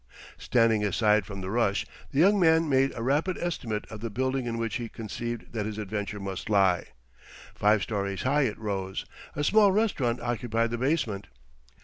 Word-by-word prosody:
Standing 115 -3 +2
aside 105 -1 +2
from 100 -2 -6
the 95 +1 -4
rush, 110 -3 +1 0.2
the 135 - -6
young 200 +5 +5
man 160 -2 +4
made 135 -1 +3
a 115 - -4
rapid 150 +8 +1
estimate 115 -11 -3
of 110 - -7
the 115 +2 -4
building 130 +2 -1
in 115 -1 -2
which 115 -1 -2
he 120 -2 -5
conceived 115 +2 -6
that 105 -2 -2
his 110 -1 -5
adventure 105 0 -4
must 95 0 -5
lie. 95 -4 +3 0.7
Five 105 -1 +3
stories 100 -2 -2
high 140 +2 +3
it 105 - -5
rose. 95 -3 -3 0.3
A 145 - -1
small 205 +5 +5
restaurant 170 - +1
occupied 115 -1 -1
the 120 - -2
basement. 125 -8 -1
115 Hz, 175 wpm, -27 LUFS, 105-135 Hz, 0.7 s, young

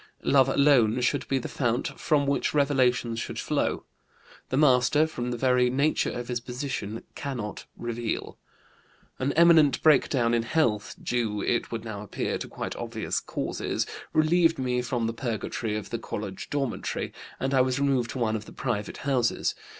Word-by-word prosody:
Love 135 -1 +4
alone 130 -5 +4
should 125 +3 0
be 135 - +1
the 130 - -3
fount 120 -2 -1
from 150 -3 +1
which 140 +1 0
revelations 125 -5 +2
should - - -5
flow; - - -1 0.6
the 130 - 0
master, 140 +1 +4
from 125 -6 -4
the 120 - -2
very 125 0 +3
nature 140 +5 +1
of 120 0 -5
his 125 -1 -2
position, 125 -3 -5
cannot 120 -7 -5
reveal. 120 -1 -3 0.8
"An 130 +2 0
imminent 165 -4 +6
breakdown 130 -5 +4
in 120 - +3
health 115 -5 0
due, 110 -4 -1
it 120 - 0
would 115 -1 -4
now 105 -3 -5
appear, 105 - -3
to - - -5
quite - - -5
obvious - - -2
causes - - -3 0.3
relieved 165 +1 +3
me 125 -1 0
from 120 -1 -1
the 115 - -1
purgatory 115 -2 -3
of 105 - -7
the 115 - -2
college 105 -3 -6
dormitory, 135 -5 -2 0.3
and 135 +1 -1
I 130 - +5
was 130 +1 +1
removed 135 -4 +1
to - - -5
one 110 -3 +1
of 105 -1 -5
the - - -12
private 105 -5 -3
houses. 130 -4 +1
125 Hz, 165 wpm, -27 LUFS, 115-140 Hz, 0.8 s, imminent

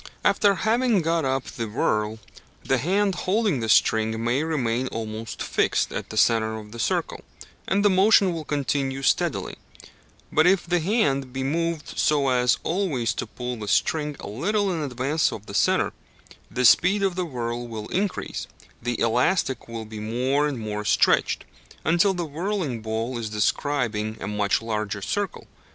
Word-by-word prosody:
After 200 -1 +4
having 225 -2 +2
got 165 -1 +1
up 130 0 0
the 115 -1 -5
whirl, 105 0 0 0.5
the - - +1
hand 195 +4 +1
holding 195 - 0
the 110 -1 -3
string 110 +1 +3
may 120 +5 +1
remain 130 -6 -1
almost 110 -1 -5
fixed - - +1
at - - -5
the 110 - -6
centre 110 -1 +3
of 105 -1 -10
the 120 - -9
circle, - - -1 0.4
and 200 +2 +1
the - - +7
motion 190 -1 +5
will 165 -2 -4
continue 135 -2 -1
steadily; - - 0 0.7
but 155 +2 +4
if 185 -1 +3
the 175 +1 +1
hand 150 - +1
be 130 +1 -3
moved 165 +2 -2
so 145 -3 +3
as 125 -1 +3
always 150 - 0
to - - -4
pull 125 +2 -5
the 105 -2 -6
string 150 +6 +1
a - - -7
little 200 - 0
in 165 - -2
advance 140 +3 0
of 105 - -8
the 100 - -9
centre, - - +2 0.6
the 125 0 0
speed 185 - +5
of 190 -2 +1
whirl 120 -7 -3
will 110 -2 -6
increase, 195 +1 -2 0.3
the 120 0 -2
elastic 125 +3 +1
will 115 -1 -6
be 110 0 -8
more 130 +7 0
and 145 -3 -3
more 105 -1 -4
stretched, - - +2 0.4
until 175 +5 +3
the 175 -1 -2
whirling 160 - -3
ball 115 +3 -3
is 110 -2 -4
describing 110 0 -1
a - - -5
much 105 +1 0
larger 105 -2 -3
circle. 205 - -3
130 Hz, 165 wpm, -24 LUFS, 110-170 Hz, 0.7 s, the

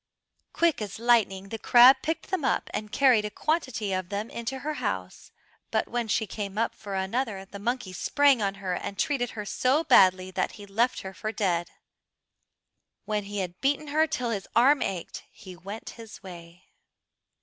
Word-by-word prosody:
Quick 335 -7 +1
as 205 -3 -5
lightning 220 -5 +2
the 225 - -5
crab 245 +4 +7
picked 320 +2 -3
them 375 -6 -1
up 260 - 0
and 210 0 -4
carried 255 -5 +4
a 210 - -3
quantity 235 - -1
of 185 -1 -3
them 205 +2 -4
into 235 +3 -4
her 305 - -1
house, 90 -1 -4 0.4
but - - 0
when 240 -1 -2
she 220 +1 +1
came 200 -1 -6
up 230 - 0
for 200 -2 -7
another 195 +1 -2
the 200 +1 -10
monkey 230 -3 -3
sprang 280 +6 +3
on 195 -1 -1
her, 195 -2 -3
and 195 +2 -5
treated 245 -2 0
her 210 - -4
so 260 +9 +1
badly 185 - +5
that 185 0 -2
he 205 - -11
left 230 +5 0
her 190 0 -8
for 215 +3 -4
dead. 175 -6 -1 1.4
When 210 -1 -2
he 205 0 -3
had 180 0 -6
beaten 290 +2 0
her 310 +2 +3
till 250 -5 -2
his 200 -3 -4
arm 270 +4 +5
ached 185 -3 -4
he 185 -4 -12
went 195 +5 -8
his 225 -3 -12
way. 175 -1 -12
210 Hz, 185 wpm, -27 LUFS, 195-250 Hz, 1.4 s, crab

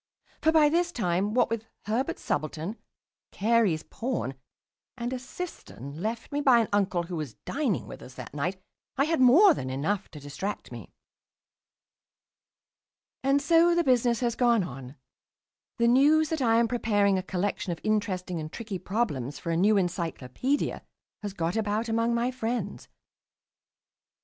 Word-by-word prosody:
For 320 - +4
by 315 -2 +6
this 345 +3 +1
time, 200 - 0
what 245 - +3
with 225 -1 -2 0.2
Herbert's 255 +10 -2
subaltern, 155 +6 -2 0.6
Carey's 210 -7 +2
pawn, 230 - -3 0.6
and 240 +1 -3
a 255 - -3
cistern 175 - -8
left 225 +3 -3
me 290 0 -1
by 265 -4 +6
an 230 -2 +1
uncle 190 -4 +1
who 175 +1 -6
was 150 -9 -5
dining 270 - -1
with - - -10
us 125 - -12
that 125 0 -9
night, 175 +6 -2 0.4
I 275 - +4
had 320 -1 +1
more 325 +10 +7
than 130 - -4
enough 170 +10 -2
to 150 - -10
distract 150 +8 -5
me. - - -9 2.3
And 275 +1 +2
so 335 +3 +5
the 345 - +3
business 245 -4 +2
has 240 -1 +1
gone 235 -4 +3
on. 135 -3 -8 0.8
The 235 -1 +3
news 295 +5 +5
that 320 -3 -2
I 230 -2 +4
am 235 0 +3
preparing 205 -5 +2
a - - -2
collection 185 0 -2
of 165 - -4
interesting 185 -5 -1
and 155 0 -6
tricky 215 -5 -5
problems 150 - -2
for 170 - -4
a - - +1
new 205 +5 +4
"Encyclopaedia" 175 - -1 0.4
has 205 -2 -5
got 170 +1 -1
about 220 +1 0
among 230 +1 +1
my 240 +2 +1
friends. 245 -1 -3
220 Hz, 155 wpm, -27 LUFS, 175-255 Hz, 2.3 s, more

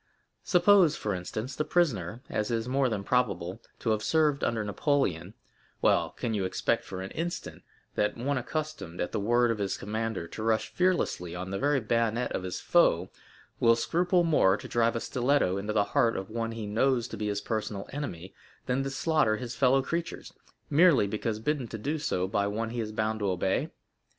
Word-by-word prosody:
Suppose, 180 -3 +5
for 105 - -2
instance, 110 +8 -5
the - - 0
prisoner, 125 - 0
as 105 0 -2
is 115 0 -1
more 130 0 +2
than 105 -3 -2
probable, 100 -5 0 0.2
to 115 - -1
have 110 -1 +1
served 150 +1 +2
under 115 -2 0
Napoleon—well, 100 - -1
can 115 - -4
you 100 -3 0
expect 95 - 0
for 95 0 -6
an 95 - -7
instant, 170 +1 -4 0.3
that 105 - 0
one 140 +4 -1
accustomed, 140 - -5
at 90 - -2
the - - -1
word 120 +3 +3
of 110 - -3
his 100 -1 -1
commander, 110 -3 -3
to 110 - -7
rush 110 0 0
fearlessly 175 - 0
on 90 +1 -5
the 100 - -2
very 145 0 +2
bayonets 115 +1 0
of - - -2
his 90 -1 -4
foe, - - +3 0.5
will 115 0 +5
scruple 175 +8 +2
more 125 - +4
to - - -9
drive 115 0 +1
a - - 0
stiletto 125 -6 +1
into 105 +2 -3
the 105 -1 +3
heart 115 -1 +3
of 95 +2 -6
one 115 0 -2
he 115 -2 -5
knows 120 +3 +1
to - - -6
be 105 0 -3
his 100 -1 -1
personal 105 -2 -3
enemy, 95 - -6 0.3
than 130 +1 0
to 135 - -2
slaughter 135 -5 +1
his 120 +1 -6
fellow 135 +2 +3
creatures, 170 +4 -4 0.3
merely 155 - +5
because 105 +2 -2
bidden 135 +2 -1
to 110 - -6
do 145 +8 -2
so 95 -12 -1
by 100 +1 0
one 110 +2 -2
he 120 - -4
is 110 -2 -3
bound 110 0 -1
to 100 -2 0
obey? 95 +1 0
115 Hz, 195 wpm, -29 LUFS, 100-135 Hz, 0.5 s, Suppose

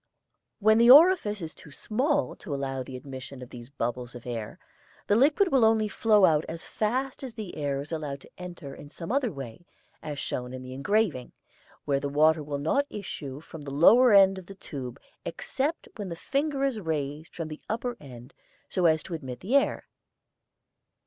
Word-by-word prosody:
Where 215 +1 +5
the 235 +2 +5
orifice 275 - +7
is 160 - -6
too - - -15
small 270 - 0
to 150 -8 -5
allow 135 -1 -3
of 130 - -5
the 130 - -6
admission 130 -1 -9
of 125 - -12
these 120 0 -10
bubbles 125 -2 -4
of 120 - -10
air, 115 -3 -5 0.5
the - - +2
liquid 295 - +4
will 265 -3 +4
only 220 -1 +4
flow 210 -1 +4
out 155 -2 +3
as 165 0 -6
fast 255 +5 -2
as 250 -4 -7
the 215 -5 -7
air 140 -2 -1
is 145 - -9
allowed 145 -4 -4
to - - -15
enter 175 -6 -8
in 145 - -11
some 165 +5 -7
other 260 -3 +1
way, 135 +2 -9 0.3
as 150 -2 -5
shown 125 -3 -4
in 130 0 -7
the 130 0 -8
engraving, 155 - 0 0.5
where 140 -1 +1
the 140 - -3
water 155 +2 +4
will 145 -1 -4
not 220 - +1
issue 145 -8 -6
from 160 -1 -10
the 145 - -7
lower 215 - +6
end 195 -1 +6
of 180 - -14
the 195 - -10
tube 130 -9 -7 0.2
except 275 - -3
when 205 -3 -5
the 170 - -4
finger 275 - -1
is 270 -5 0
raised 155 -3 -4
from 165 -2 -4
the 155 -1 -8
upper 235 +2 -2
end 125 -2 -12 0.4
so 180 -2 +2
as 160 -1 +3
to 180 - -7
admit 130 -6 -6
the 230 +9 0
air. 280 - +2
160 Hz, 195 wpm, -27 LUFS, 140-220 Hz, 0.5 s, orifice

